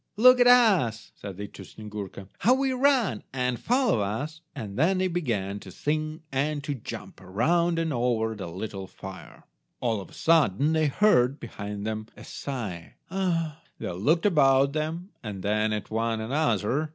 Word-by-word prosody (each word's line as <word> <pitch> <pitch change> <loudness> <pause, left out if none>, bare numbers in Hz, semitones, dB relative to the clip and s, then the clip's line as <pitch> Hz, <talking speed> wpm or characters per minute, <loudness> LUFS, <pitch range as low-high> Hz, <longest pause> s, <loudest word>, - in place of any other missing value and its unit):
"Look 255 +3 +7
at 245 - +6
us," 195 - +4
said 100 -3 -8
they 105 - -4
to 100 - -11
Snyegurka, 100 -1 -8
"how 250 +3 +5
we 270 0 +1
run, 255 - +2
and 125 -2 -1
follow 250 - +2
us," 140 +11 -3
and 105 -8 -6
then 170 - +3
they 185 0 +2
began 115 - -2
to 95 - -11
sing 155 - -2
and 145 +2 -1
to 145 - -2
jump, 130 - -8
around 165 - +1
and 165 -2 0
over 120 -2 +1
the 100 -5 -6
little 95 +2 -6
fire. 95 0 -11 0.4
All 115 -4 0
of - - -11
a - - -17
sudden 155 - +3
they 160 -1 +3
heard, 140 -6 +3
behind 105 -2 -6
them, 110 0 -3
a - - -10
sigh— 105 -12 -6 0.2
"Ah!" 165 -5 -1 0.2
They - - -4
looked 145 - +1
about 140 -6 +4
them, 160 +4 -3
and 100 -5 -6
then 110 +1 +1
at 105 0 -4
one 115 0 0
another. 130 +2 0
130 Hz, 170 wpm, -27 LUFS, 105-165 Hz, 0.4 s, Look